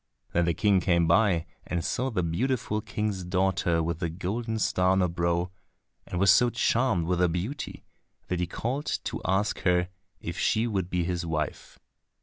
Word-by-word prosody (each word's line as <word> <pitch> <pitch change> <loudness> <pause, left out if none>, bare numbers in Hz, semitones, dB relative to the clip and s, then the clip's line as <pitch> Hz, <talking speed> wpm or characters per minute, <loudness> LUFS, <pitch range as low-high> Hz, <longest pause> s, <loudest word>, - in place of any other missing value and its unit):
Then 85 0 +3
the 85 -1 +1
King 100 +1 +3
came 85 -1 +2
by 85 -1 +3 0.2
and 85 -2 -3
saw 130 +2 0
the 100 -8 -1
beautiful 105 +5 -1
King's 105 -3 -3
daughter 90 -2 +1
with 85 0 -2
the 85 - -1
golden 110 +7 -3
star 90 -3 +2
on 95 0 +3
her 90 - +3
brow, 85 +1 0 0.6
and 90 - -3
was 95 -1 +6
so 120 +6 +5
charmed 115 -7 +1
with 90 +1 0
her 90 - +4
beauty 95 - -4 0.4
that 90 - -1
he 90 - 0
called 130 - -3 0.2
to - - -4
ask 95 +4 +1
her 90 -1 +2 0.3
if 85 +2 -5
she 110 +1 +2
would 95 -6 -1
be 90 -1 0
his 90 0 -2
wife. 80 -3 -3
90 Hz, 180 wpm, -27 LUFS, 85-105 Hz, 0.6 s, was